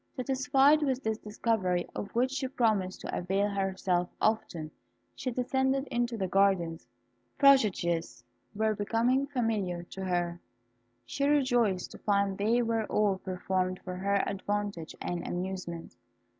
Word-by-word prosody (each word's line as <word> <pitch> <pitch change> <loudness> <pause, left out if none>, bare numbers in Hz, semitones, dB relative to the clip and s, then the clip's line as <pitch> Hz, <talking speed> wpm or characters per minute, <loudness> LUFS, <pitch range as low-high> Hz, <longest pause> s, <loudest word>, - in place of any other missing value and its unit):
Satisfied 270 +3 +3
with 265 -2 0
this 220 0 -1
discovery, 205 -4 -1
of 200 - -4
which 255 +2 +2
she 270 -1 -2
promised 215 -7 0
to - - -4
avail 195 +3 0
herself 190 -2 0
often, 175 -8 0 0.4
she 255 - -4
descended 265 +2 0
into 240 -1 0
the 190 -3 -1
gardens. 185 -5 +1 0.5
Prodigies 185 - +3 0.3
were 220 +1 +1
becoming 235 +6 +1
familiar 215 -10 -1
to 190 - -6
her. 175 -2 -1 0.7
She 280 - -1
rejoiced 245 -10 +2
to - - -11
find 200 -1 +1
they 225 +5 +2
were 225 -1 0
all 205 -3 +1
performed 185 0 -2
for 185 - -5
her 200 +1 +1
advantage 200 -4 -3
and 175 -1 -4
amusement. 180 -2 -5
205 Hz, 130 wpm, -30 LUFS, 185-245 Hz, 0.7 s, Satisfied